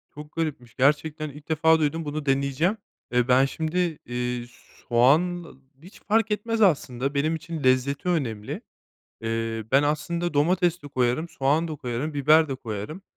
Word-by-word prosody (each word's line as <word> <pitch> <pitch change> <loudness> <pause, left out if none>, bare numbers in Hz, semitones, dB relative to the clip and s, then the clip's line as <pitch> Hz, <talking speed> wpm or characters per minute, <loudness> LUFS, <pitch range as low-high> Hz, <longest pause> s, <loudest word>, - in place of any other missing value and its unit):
Çok 150 +1 -10
garipmiş, 145 -8 -4
gerçekten 150 +3 +1
ilk 145 +2 -13
defa 160 +1 +4
duydum, 160 +1 -1
bunu 150 0 -4
deneyeceğim. 140 +8 +1 0.3
Eee, 125 0 +2
ben 130 +1 +5
şimdi, 160 +4 -3 0.3
eee, 125 0 -3 0.4
soğan 160 +9 +3 0.4
hiç 180 +5 -15
fark 220 +1 +1
etmez 225 +2 -1
aslında 140 - +2
benim 155 +3 +1
için, 160 -1 -6
lezzeti 130 +6 +2
önemli. 115 -11 -2 0.6
Eee, 115 0 -2
ben 135 +1 +6
aslında 170 +3 -1
domates 175 +3 +2
de 145 - -9
koyarım, 130 +4 0
soğan 150 +3 +1
da 155 - -5
koyarım, 135 +3 -4
biber 155 +3 +4
de 135 - -2
koyarım. 120 - -6
145 Hz, 150 wpm, -25 LUFS, 130-165 Hz, 0.6 s, ben